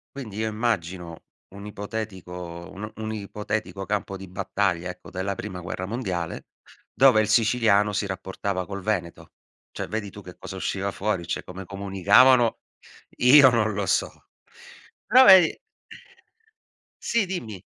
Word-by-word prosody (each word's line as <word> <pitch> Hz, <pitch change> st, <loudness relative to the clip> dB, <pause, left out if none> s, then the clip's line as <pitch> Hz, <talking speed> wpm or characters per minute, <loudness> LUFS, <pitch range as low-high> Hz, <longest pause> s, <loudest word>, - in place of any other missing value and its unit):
Quindi 115 Hz, -7 st, -8 dB
io 110 Hz, 0 st, -1 dB
immagino 95 Hz, -7 st, -3 dB, 0.3 s
un 100 Hz, +1 st, -10 dB
ipotetico 95 Hz, -5 st, -7 dB
uno 105 Hz, +3 st, -7 dB
un 110 Hz, 0 st, -5 dB
ipotetico 105 Hz, -1 st, -4 dB
campo 100 Hz, -1 st, -3 dB
di 95 Hz, 0 st, -10 dB
battaglia, 90 Hz, -1 st, -2 dB
ecco, 90 Hz, -, -10 dB
della 95 Hz, +2 st, -3 dB
prima 95 Hz, -3 st, -7 dB
guerra 90 Hz, +2 st, -5 dB
mondiale, 95 Hz, -6 st, -4 dB, 0.4 s
dove 110 Hz, -, +5 dB
il 105 Hz, -, -1 dB
siciliano 110 Hz, -2 st, +3 dB
si 100 Hz, 0 st, -1 dB
rapportava 95 Hz, 0 st, -4 dB
col 100 Hz, 0 st, -6 dB
veneto. 90 Hz, -4 st, -4 dB, 0.4 s
Cioè -, -, -5 dB
vedi 105 Hz, -2 st, -4 dB
tu 105 Hz, -, -11 dB
che 90 Hz, -2 st, -12 dB
cosa 95 Hz, 0 st, -9 dB
usciva 95 Hz, +1 st, -2 dB
fuori? 95 Hz, -4 st, -2 dB
Cioè -, -, -3 dB
come 95 Hz, +1 st, -9 dB
comunicavano 100 Hz, +6 st, +4 dB, 0.6 s
io 130 Hz, +2 st, +8 dB
non 110 Hz, -2 st, +1 dB
lo 100 Hz, 0 st, -2 dB
so. -, -, -1 dB, 0.8 s
Però 255 Hz, +4 st, +7 dB
vedi 185 Hz, -4 st, +7 dB, 1.4 s
Sì, 230 Hz, -3 st, +1 dB
dimmi. 115 Hz, -, -6 dB
100 Hz, 140 wpm, -25 LUFS, 95-110 Hz, 1.4 s, io